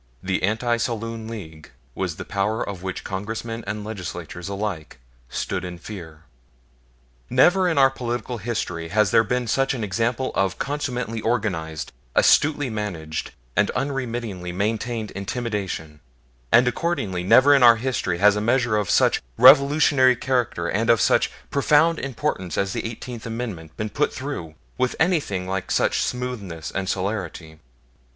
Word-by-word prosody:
The 95 Hz, 0 st, -1 dB
Anti 115 Hz, +4 st, +1 dB
Saloon 115 Hz, -1 st, -3 dB
League 80 Hz, -9 st, -9 dB, 0.2 s
was 90 Hz, -1 st, -3 dB
the -, -, -7 dB
power 105 Hz, +2 st, -1 dB
of 100 Hz, -3 st, -6 dB
which 95 Hz, -1 st, -5 dB
Congressmen 115 Hz, +4 st, -4 dB
and 105 Hz, +1 st, -3 dB
Legislaturemen 90 Hz, -4 st, -6 dB
alike 100 Hz, -8 st, -4 dB, 0.3 s
stood 95 Hz, +6 st, -3 dB
in 90 Hz, -1 st, -6 dB
fear. 85 Hz, -4 st, -10 dB, 1.1 s
Never 180 Hz, +9 st, +4 dB
in 165 Hz, -, -1 dB
our 135 Hz, -1 st, +6 dB
political 120 Hz, -2 st, -4 dB
history 90 Hz, -7 st, -3 dB
has 105 Hz, +2 st, +2 dB
there 115 Hz, -, +5 dB
been 125 Hz, +3 st, -1 dB
such 135 Hz, +4 st, +1 dB
an 115 Hz, -, -4 dB
example 115 Hz, +6 st, -1 dB
of 95 Hz, -1 st, 0 dB
consummately 125 Hz, -6 st, -3 dB
organized, 90 Hz, -10 st, -2 dB, 0.2 s
astutely 145 Hz, -2 st, +4 dB
managed, 95 Hz, -9 st, -4 dB, 0.3 s
and 100 Hz, -, +3 dB
unremittingly 120 Hz, -8 st, -3 dB
maintained 110 Hz, +3 st, -2 dB
intimidation; 100 Hz, -7 st, -4 dB, 0.5 s
and 125 Hz, +2 st, +6 dB
accordingly 125 Hz, -, -1 dB
never 130 Hz, +10 st, +6 dB
in 140 Hz, -, +5 dB
our 120 Hz, -1 st, +8 dB
history 115 Hz, -7 st, -1 dB
has 105 Hz, +3 st, +5 dB
a 105 Hz, -, -1 dB
measure 120 Hz, 0 st, +2 dB
of 105 Hz, -2 st, -1 dB
such -, -, +3 dB, 0.2 s
revolutionary 140 Hz, 0 st, +6 dB
character 120 Hz, -9 st, -1 dB
and 110 Hz, +6 st, 0 dB
of 115 Hz, -2 st, +5 dB
such -, -, +3 dB, 0.2 s
profound 150 Hz, +3 st, +3 dB
importance 120 Hz, -, -3 dB
as 100 Hz, -1 st, 0 dB
the -, -, -3 dB
Eighteenth 115 Hz, 0 st, -8 dB
Amendment 110 Hz, -9 st, -6 dB
been 105 Hz, 0 st, -3 dB
put 150 Hz, -, +1 dB
through 130 Hz, -, -6 dB, 0.2 s
with 130 Hz, 0 st, +1 dB
anything 150 Hz, -, +1 dB
like 95 Hz, 0 st, -3 dB
such -, -, +2 dB
smoothness 105 Hz, -11 st, -4 dB
and 95 Hz, -1 st, -3 dB
celerity. 90 Hz, -5 st, -4 dB
110 Hz, 145 wpm, -23 LUFS, 95-125 Hz, 1.1 s, our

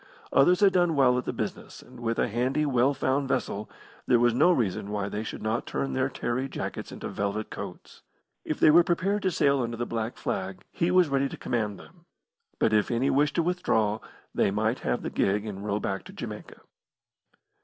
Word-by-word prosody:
Others 175 Hz, +8 st, +5 dB
had 195 Hz, -2 st, +6 dB
done 175 Hz, -3 st, +3 dB
well 130 Hz, -3 st, +4 dB
at 125 Hz, -, -6 dB
the -, -, -1 dB
business, -, -, -6 dB
and -, -, -14 dB
with 115 Hz, -1 st, -1 dB
a -, -, +2 dB
handy, 125 Hz, +6 st, 0 dB
well 135 Hz, 0 st, +2 dB
found 135 Hz, +2 st, 0 dB
vessel, 105 Hz, -5 st, -2 dB, 0.4 s
there 120 Hz, -, +5 dB
was 120 Hz, 0 st, +3 dB
no 150 Hz, +9 st, +5 dB
reason 105 Hz, -, 0 dB
why 100 Hz, -1 st, -2 dB
they 105 Hz, +2 st, -3 dB
should 110 Hz, -, -6 dB
not 110 Hz, +2 st, -1 dB
turn 135 Hz, -, -2 dB
their 130 Hz, 0 st, +1 dB
tarry 130 Hz, 0 st, -2 dB
jackets -, -, -5 dB
into -, -, -6 dB
velvet 100 Hz, +2 st, -3 dB
coats. -, -, -8 dB, 0.4 s
If 155 Hz, -, -3 dB
they 155 Hz, -, +7 dB
were 170 Hz, +3 st, +7 dB
prepared 190 Hz, +4 st, 0 dB
to 190 Hz, -, +1 dB
sail 140 Hz, -5 st, +2 dB
under 115 Hz, -1 st, -3 dB
the 120 Hz, -, -2 dB
black 115 Hz, 0 st, -3 dB
flag, 95 Hz, 0 st, -4 dB
he 170 Hz, -, 0 dB
was 180 Hz, -3 st, +4 dB
ready 140 Hz, 0 st, +1 dB
to -, -, -8 dB
command 105 Hz, -4 st, -2 dB
them; 170 Hz, -1 st, -17 dB, 0.5 s
but 110 Hz, -, +2 dB
if 105 Hz, -1 st, +3 dB
any 125 Hz, +3 st, +1 dB
wished 145 Hz, +1 st, +2 dB
to 170 Hz, -, +2 dB
withdraw, 110 Hz, -, +1 dB, 0.3 s
they -, -, +2 dB
might 110 Hz, +4 st, 0 dB
have -, -, -2 dB
the -, -, -3 dB
gig 100 Hz, +2 st, +1 dB
and 100 Hz, -2 st, -6 dB
row 105 Hz, 0 st, -1 dB
back 95 Hz, -2 st, -3 dB
to -, -, -11 dB
Jamaica. -, -, -8 dB
125 Hz, 210 wpm, -27 LUFS, 110-150 Hz, 0.5 s, they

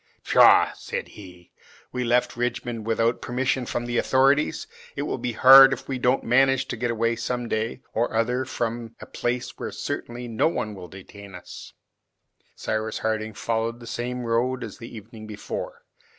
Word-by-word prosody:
"Pshaw," -, -, +6 dB
said -, -, -6 dB
he, 90 Hz, -4 st, -14 dB, 0.4 s
"we 125 Hz, 0 st, -2 dB
left 120 Hz, +1 st, +1 dB
Richmond 120 Hz, -2 st, -3 dB
without 115 Hz, +1 st, +1 dB
permission 130 Hz, +1 st, -1 dB
from 120 Hz, -, -3 dB
the 120 Hz, 0 st, 0 dB
authorities! 135 Hz, +3 st, +2 dB, 0.3 s
It 145 Hz, -, -2 dB
will 145 Hz, -, -3 dB
be 120 Hz, 0 st, -3 dB
hard 135 Hz, +3 st, +9 dB
if -, -, -7 dB
we 130 Hz, -2 st, -3 dB
don't 125 Hz, +2 st, +2 dB
manage 135 Hz, +2 st, +3 dB
to -, -, -2 dB
get 120 Hz, +1 st, -2 dB
away 115 Hz, 0 st, 0 dB
some 120 Hz, +1 st, -3 dB
day 110 Hz, 0 st, -3 dB
or 115 Hz, 0 st, -1 dB
other 125 Hz, +3 st, +1 dB
from 115 Hz, -2 st, -4 dB
a -, -, -9 dB
place 120 Hz, 0 st, -3 dB
where -, -, -4 dB
certainly 120 Hz, +1 st, -5 dB
no 115 Hz, +4 st, +1 dB
one 110 Hz, -10 st, -3 dB
will 90 Hz, -3 st, -9 dB
detain 100 Hz, +2 st, -12 dB
us!" -, -, -11 dB, 0.8 s
Cyrus 110 Hz, 0 st, -3 dB
Harding 110 Hz, -1 st, -2 dB
followed 115 Hz, +1 st, -2 dB
the 120 Hz, -, -11 dB
same 125 Hz, +1 st, -4 dB
road 120 Hz, +2 st, 0 dB
as -, -, -8 dB
the 115 Hz, -, -9 dB
evening 110 Hz, 0 st, -11 dB
before. 105 Hz, -1 st, -6 dB
120 Hz, 170 wpm, -24 LUFS, 110-125 Hz, 0.8 s, hard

